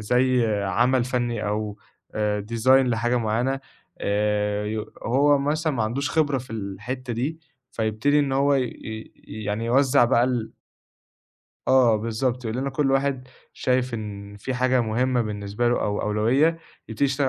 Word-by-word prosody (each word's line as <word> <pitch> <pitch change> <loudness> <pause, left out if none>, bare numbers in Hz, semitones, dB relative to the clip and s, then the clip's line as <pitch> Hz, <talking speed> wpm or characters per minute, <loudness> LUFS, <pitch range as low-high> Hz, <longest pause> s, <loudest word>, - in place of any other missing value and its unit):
زي 125 +2 +2 0.2
عَمل 120 +6 +2
فَنّي 120 -3 -2
أو 105 0 -3 0.4
آآ 105 -1 -1
design 115 +2 -1
لحاجة 125 -2 +4
معيّنة، 120 +4 0 0.4
آآ 105 0 0
يو 110 0 -4
هو 140 +4 +3
مثلًا 155 +3 0
ما 120 -5 -1
عندوش 125 +7 -1
خبرة 145 -4 +1
في 130 +1 -11
الحتّة 115 +5 -5
دي، 145 +8 -3 0.3
فيبتدي 110 +7 +1
إن 140 -2 +1
هو 140 +1 +3
ي 135 - +2
ي 110 -2 -8 0.3
يعني 105 +3 -2
يوزّع 135 +2 +4
بقى 120 0 +3
ال 125 -3 -2 1.2
آه، 125 -4 +5
بالضبط، 115 +3 -2
يقول 110 +1 -3
لنا: 135 +1 -2
"كل 135 +1 0
واحد 135 -1 0 0.2
شايف 125 -1 0
إن 100 -2 -7
في 130 +6 -4
حاجة 130 0 +2
مهمّة 120 +2 +1
بالنسبة 105 +2 -2
له 120 - +1
أو 105 0 -1
أولوية 110 +8 +2 0.4
يبتدي 115 +5 0
يتشتغل 135 0 +1
120 Hz, 155 wpm, -24 LUFS, 110-130 Hz, 1.2 s, آه